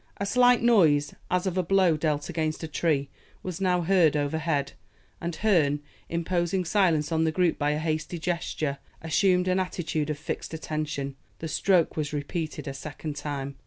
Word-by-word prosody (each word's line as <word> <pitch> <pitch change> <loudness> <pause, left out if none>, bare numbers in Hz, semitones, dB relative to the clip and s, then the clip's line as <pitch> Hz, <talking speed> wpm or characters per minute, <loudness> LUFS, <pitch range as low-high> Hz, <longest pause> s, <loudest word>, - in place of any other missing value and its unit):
A 200 - -2
slight 245 +3 +4
noise, 160 -11 +4 0.2
as 180 +1 +1
of 185 -1 0
a - - +2
blow 185 -2 +3
dealt 150 -1 -1
against 160 -2 -2
a - - -2
tree, 150 -3 0 0.3
was 185 0 -5
now 180 -2 +2
heard 170 -4 +4
overhead, 145 -1 -1 0.5
and 170 -1 -3
Herne, 160 -9 +2 0.3
imposing 175 +2 0
silence 170 -5 +2
on 160 0 +2
the 160 - +2
group 175 0 +1
by 145 0 +1
a 150 - +1
hasty 155 +2 -2
gesture, 160 -4 -2 0.2
assumed 180 +3 +2
an 185 +1 +2
attitude 160 -4 -2
of 150 - -2
fixed 160 +1 -5
attention. 150 -3 -4 0.2
The 160 - -5
stroke 175 +2 +2
was 150 -1 -2
repeated 155 +2 -4
a 135 - -3
second 145 +2 -6
time. 140 -2 -5
160 Hz, 170 wpm, -27 LUFS, 150-180 Hz, 0.5 s, slight